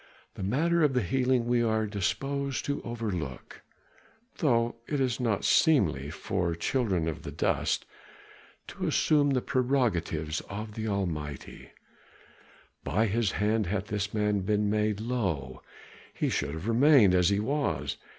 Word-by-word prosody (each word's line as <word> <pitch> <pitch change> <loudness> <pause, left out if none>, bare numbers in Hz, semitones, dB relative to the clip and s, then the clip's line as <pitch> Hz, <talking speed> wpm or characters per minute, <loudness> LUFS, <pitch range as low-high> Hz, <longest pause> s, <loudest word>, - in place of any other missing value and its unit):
"The 110 - -9
matter 160 - +1
of 150 -3 +3
the 125 - +2
healing 125 +4 +1
we 120 0 +2
are 110 -1 +1
disposed 125 +8 -2
to 140 0 -2
overlook, 100 - -5 0.8
though 120 -6 +1
it 145 - -1
is 130 -2 0
not 115 -5 0
seemly 80 - +3
for 85 +2 -2
children 95 -4 0
of 80 - -4 0.2
dust - - 0 0.8
to - - -4
assume 145 -2 +3
the 130 -3 +1
prerogatives 100 - 0
of 105 +2 -6
the 110 0 -4
Almighty; 80 -9 -4 1.1
by 110 +4 +1
his 110 -1 0
hand 105 -1 +1
hath 100 +2 -2
this 105 0 -2
man 105 -1 +1
been 105 +1 0
laid 105 -1 0
low, 95 - -2 0.5
he - - -1
should 70 +2 -2
have 80 +6 -6
remained 120 -4 +5
as 90 0 +4
he 100 0 +1
was. 105 - -1
105 Hz, 140 wpm, -28 LUFS, 90-125 Hz, 1.1 s, remained